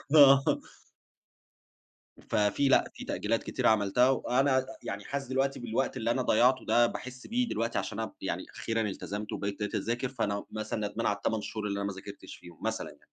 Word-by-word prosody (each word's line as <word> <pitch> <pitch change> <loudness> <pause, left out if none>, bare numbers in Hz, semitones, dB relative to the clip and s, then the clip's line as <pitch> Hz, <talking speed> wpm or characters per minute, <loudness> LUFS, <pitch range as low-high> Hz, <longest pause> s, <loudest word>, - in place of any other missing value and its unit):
آه. 140 -2 +9 1.9
ففيه 105 +7 +2
لأ، - - +4
في - - -8
تأجيلات - - -1
كتيرة - - +1
عملتها 110 +4 +4
وأنا 135 +1 +2
ع 130 0 +4 0.2
يعني 100 +1 -4
حاسس 140 +1 -4
دلوقتي 135 +1 0
بالوقت 120 +3 -1
اللي 115 0 0
أنا 130 +1 +1
ضيّعته 125 +2 +3
ده 120 0 +5
باحِس 130 +1 -7
بيه 245 +1 +1
دلوقتي 115 - -1
عشان - - -4
أب - - -3
يعني - - -3
أخيرًا 115 0 -1
التزمت 105 0 -4
وبقيت 100 +1 -3
دلوقتي 105 -1 -1
أذاكر، 120 +5 -2
فأنا 100 -6 -2
مثلًا 110 -1 -2
ندمان 115 +3 -4
على 100 - +2
ال8 110 0 -1
شهور 105 0 -4
اللي 100 0 -2
أنا 100 - -1
ما 100 - -3
ذاكرتش 100 +1 -10
فيهم، 85 -2 -14
مثلًا - - -2
يعني. - - -16
115 Hz, 185 wpm, -30 LUFS, 105-130 Hz, 1.9 s, آه